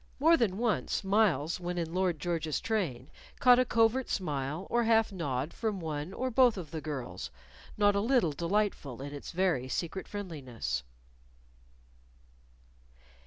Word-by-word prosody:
More 325 +4 +6
than 220 - +1
once 215 - 0
Myles, 190 -6 +2
when 180 0 -4
in 165 -1 -2
Lord 185 -2 +1
George's 160 -2 -1
train, 165 - -2 0.3
caught 250 -1 +7
a 255 - +4
covert 230 +3 +2
smile 150 0 -2
or 235 0 +1
half 225 -1 +3
nod 145 -6 -3
from 215 -4 -2
one 155 0 -4
or 255 +5 -2
both 245 -2 +5
of 165 -5 -7
the 160 -2 -4
girls, 135 - -5 0.5
not 205 -1 +4
a - - +3
little 235 - +3
delightful 170 - -1
in 145 +1 -6
its 145 - -7
very 170 -8 +1
secret 170 +7 -3
friendliness. 130 - -4
180 Hz, 145 wpm, -31 LUFS, 150-220 Hz, 0.5 s, caught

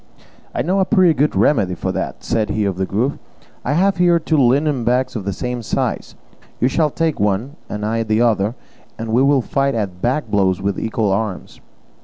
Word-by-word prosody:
"I - - 0
know 185 +6 +1
a 185 -3 +4
good 150 +1 +1
remedy 95 -11 +2
for - - -3
that," - - -4
said 110 -2 0
he 105 -1 0
of 95 -2 -2
the 95 0 -1
Grove; 120 +8 -1 0.4
"I 140 - 0
have 190 +4 +2
here 175 -1 +4
two 160 -1 0
linen 135 +1 +2
bags 125 +2 0
of 105 -5 -4
the 100 - -1
same 125 +5 -4
size; 110 - -2 0.4
you 125 - +3
shall 150 +3 +1
take 160 +1 -1
one, 105 +8 0
and 105 0 -4
I 115 +1 0
the 110 -1 0
other, 110 -1 +1 0.4
and 115 0 -5
we 120 - +4
will 140 -2 +3
fight 135 0 0
at 95 -5 -3
bag 135 +5 -1
blows 95 -2 +2
with 100 0 -2
equal 110 -2 -1
arms." 100 -1 -3
120 Hz, 200 wpm, -19 LUFS, 105-145 Hz, 0.4 s, a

